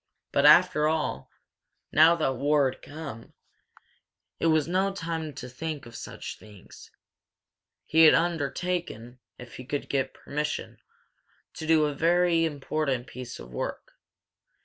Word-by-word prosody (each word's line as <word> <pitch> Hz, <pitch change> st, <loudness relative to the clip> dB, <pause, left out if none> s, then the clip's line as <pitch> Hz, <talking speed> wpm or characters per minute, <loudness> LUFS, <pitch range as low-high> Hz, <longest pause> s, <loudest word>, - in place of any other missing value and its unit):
But, 140 Hz, +1 st, +4 dB
after 155 Hz, -1 st, +6 dB
all, 155 Hz, -, -2 dB, 0.6 s
now 160 Hz, +3 st, +6 dB
that 155 Hz, -5 st, 0 dB
war 140 Hz, 0 st, +2 dB
had -, -, -15 dB
come, 145 Hz, -7 st, -9 dB, 1.1 s
it -, -, +1 dB
was 155 Hz, -2 st, +3 dB
no 190 Hz, +3 st, +1 dB
time 165 Hz, -4 st, -4 dB
to 125 Hz, -, -7 dB
think 145 Hz, +2 st, -6 dB
of 120 Hz, -1 st, -12 dB
such -, -, -8 dB
things. 105 Hz, -3 st, -15 dB, 1.0 s
He 160 Hz, +1 st, +5 dB
had 155 Hz, -, +8 dB
undertaken, 165 Hz, -6 st, -2 dB, 0.2 s
if 125 Hz, -1 st, -11 dB
he 125 Hz, -, -8 dB
could 140 Hz, +3 st, -4 dB
get 135 Hz, -1 st, -1 dB
permission, 150 Hz, +1 st, -4 dB, 0.7 s
to 160 Hz, -, -7 dB
do 160 Hz, -1 st, +4 dB
a -, -, 0 dB
certain 140 Hz, -, -8 dB
very 170 Hz, 0 st, +3 dB
important 140 Hz, -4 st, -2 dB
piece 125 Hz, -2 st, -8 dB
of -, -, -11 dB
work. 60 Hz, -, -5 dB
150 Hz, 140 wpm, -27 LUFS, 130-165 Hz, 1.1 s, had